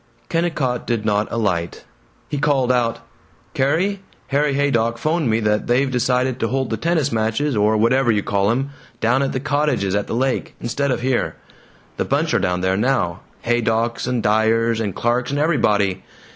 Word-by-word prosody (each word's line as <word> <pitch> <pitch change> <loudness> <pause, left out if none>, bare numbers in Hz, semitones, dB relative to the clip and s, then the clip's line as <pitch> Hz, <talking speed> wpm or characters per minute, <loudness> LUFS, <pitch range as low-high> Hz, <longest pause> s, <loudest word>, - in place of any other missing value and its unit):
Kennicott 155 -8 -1
did 115 -3 -1
not 105 0 0
alight. 95 -7 -1 0.4
He 145 - -3
called 135 -4 +2
out, 120 -2 0 0.5
"Carrie! 180 +9 +1 0.3
Harry 145 0 +1
Haydock 115 -5 +1
'phoned 155 +1 0
me 110 0 +2
that 105 0 0
they've 130 +3 +2
decided 125 +1 0
to 115 - 0
hold 130 0 -1
the 110 - -1
tennis 160 +2 0
matches, 115 +5 0
or 105 +1 +3
whatever 120 +3 +3
you 105 -2 0
call 100 0 +1
'em, 135 +5 -1 0.3
down 125 +4 +2
at 135 - 0
the 130 - -2
cottages 145 -8 0
at 100 0 -1
the - - -3
lake, 130 +2 -1
instead 140 +4 -2
of 125 - -1
here. 130 0 0 0.6
The - - -1
bunch - - 0
are - - +3
down 90 0 0
there 95 0 +1
now: 105 -6 0 0.2
Haydocks 115 0 0
and 125 -3 -1
Dyers 110 +2 +2
and 105 -5 -2
Clarks 120 +1 0
and 140 +1 -1
everybody. 105 - +1
120 Hz, 175 wpm, -20 LUFS, 110-135 Hz, 0.6 s, or